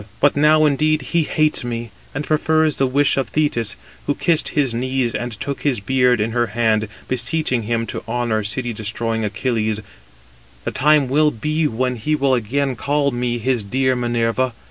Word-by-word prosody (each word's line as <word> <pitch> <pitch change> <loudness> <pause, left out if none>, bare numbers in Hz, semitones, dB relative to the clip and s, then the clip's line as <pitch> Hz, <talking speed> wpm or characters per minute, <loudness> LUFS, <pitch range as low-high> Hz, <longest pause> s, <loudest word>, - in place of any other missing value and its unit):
But 145 - +3
now, 155 +2 +5
indeed, 150 0 +2
he 170 - +4
hates 155 -2 +1
me, 120 -2 -4 0.2
and 145 - -3
prefers 155 -1 +2
the 135 - +2
wish 140 +3 +2
of 135 - -1
Thetis, 120 -9 0 0.3
who 145 - +1
kissed 165 -3 +1
his 140 -5 0
knees, 130 0 -1
and 120 +3 -3
took 140 +4 -4
his 135 -6 +1
beard 125 +2 +2
in 110 +2 0
her 120 0 +1
hand, 110 -2 +2 0.2
beseeching 130 +1 0
him 115 -1 0
to - - -5
honour 115 -2 -1
city 120 +3 -3
destroying 110 +1 -2
Achilles, 110 0 -1 0.8
The - - -2
time 150 -1 +3
will 150 +4 +3
be 150 +5 -1
when 125 0 -1
he 150 +8 0
will 140 -2 +2
again 130 +3 0
call 145 +2 0
me 120 -1 -1
his 120 0 0
dear 130 +5 0
Minerva. 120 +1 0
130 Hz, 175 wpm, -20 LUFS, 115-145 Hz, 0.8 s, now